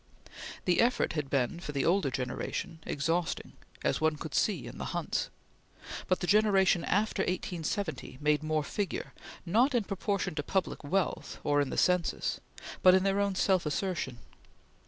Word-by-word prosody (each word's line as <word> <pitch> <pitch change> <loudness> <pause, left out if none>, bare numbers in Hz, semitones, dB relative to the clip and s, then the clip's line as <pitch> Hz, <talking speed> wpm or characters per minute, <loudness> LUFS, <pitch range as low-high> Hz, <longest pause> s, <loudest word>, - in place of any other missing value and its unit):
The 180 -2 +4
effort 245 +2 +2
had 150 -4 -2
been, 135 +4 0
for 150 -4 -6
the 140 -1 0
older 180 -4 +3
generation, 130 +5 -3
exhausting, 165 +4 -1 0.3
as - - +1
one 160 0 +3
could 150 0 -7
see 175 - +1
in 120 - -9
the - - -4
Hunts; - - -1 0.8
but 185 - +1
the - - 0
generation 195 -3 +4
after 205 0 +1
1870 180 - -3
made 150 0 +2
more 155 -1 0
figure, 200 +6 -3 0.3
not 240 +10 +3
in 235 - +3
proportion 200 -2 -2
to 150 - -2
public 190 +4 -1
wealth 180 +4 -1
or 145 0 +3
in 140 - -1
the - - -4
census, 180 -2 +1 0.4
but 185 0 +8
in 190 - +3
their 195 0 +2
own 200 -1 +1
self 185 -1 +3
assertion. 150 -5 -2
175 Hz, 160 wpm, -30 LUFS, 150-195 Hz, 0.8 s, but